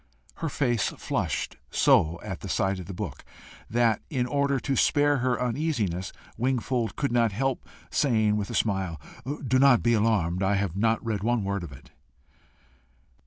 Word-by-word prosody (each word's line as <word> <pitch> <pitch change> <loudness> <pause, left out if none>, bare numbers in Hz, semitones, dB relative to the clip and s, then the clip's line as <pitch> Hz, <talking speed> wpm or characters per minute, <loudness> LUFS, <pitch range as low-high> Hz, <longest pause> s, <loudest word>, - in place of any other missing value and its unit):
Her 165 - -2
face 120 -8 +1
flushed - - -2
so 85 +2 +3
at 95 -4 -6
sight 95 +1 0
of 90 - -8
the 100 - -6
book, - - -6 0.5
that, 115 -2 +2
in 130 -6 0
order 140 +1 +1
to 135 +3 -1
spare 145 +2 +3
her 125 -1 0
uneasiness, 115 - -1 0.3
Wingfold 125 -1 -1
could 140 -3 -1
not 120 -2 +3
help 135 +5 -2 0.2
saying 110 -6 +2
with 105 -1 -2
a - - -4
smile, 95 -6 0 0.5
"Do 130 +2 +3
not 135 -3 +5
be 120 - +3
alarmed: 105 -6 +1
I 100 +1 +2
have 100 -3 -1
not 115 +3 +1
read 110 -4 -1
one 120 0 +1
word 100 0 -2
of 80 - -8
it." 65 - -14
115 Hz, 165 wpm, -27 LUFS, 100-130 Hz, 0.5 s, not